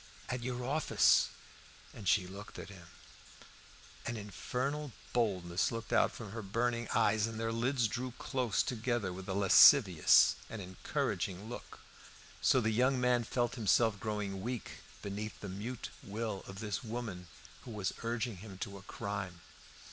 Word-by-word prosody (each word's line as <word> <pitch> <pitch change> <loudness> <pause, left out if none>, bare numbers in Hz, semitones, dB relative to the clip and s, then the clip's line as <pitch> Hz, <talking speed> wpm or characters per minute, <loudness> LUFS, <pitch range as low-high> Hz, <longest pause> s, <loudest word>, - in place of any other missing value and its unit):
"At 125 0 -2
your 125 0 -3
office." 150 +4 +4 0.6
And 105 -4 -8
she 90 +1 +4
looked 100 +3 -9
at - - -7
him. 90 -4 -12 1.2
An 120 - -2
infernal 125 - -3 0.2
boldness 95 -7 +1
looked 115 -1 -4
out - - +4
from 110 -4 -8
her 115 +1 -5
burning 115 +4 -1
eyes, 110 -1 +3
and 115 -1 -6
their 115 0 -1
lids 120 +1 +1
drew 125 +3 -4
close 125 -6 0
together 115 -5 -1
with 95 +1 -8
a 95 - -1
lascivious 100 -1 +7
and 115 - -6
encouraging 95 +1 -3
look, 120 - -9 0.6
so 130 - +5
that 110 -2 +1
the - - 0
young 130 +2 +3
man 125 -1 +3
felt 120 +1 0
himself 110 -2 +3
growing 105 -3 -3
weak 120 +1 -5 0.2
beneath 105 +2 -5
the 100 - -6
mute 110 +6 -5
will 105 -1 -4
of 95 +2 -8
this 105 -2 -3
woman 110 -6 -5 0.3
who - - -11
was 105 -4 -2
urging 115 -2 -2
him 100 0 -10
to 100 +1 -6
a - - -13
crime. 100 -4 -5
110 Hz, 155 wpm, -33 LUFS, 100-120 Hz, 1.2 s, lascivious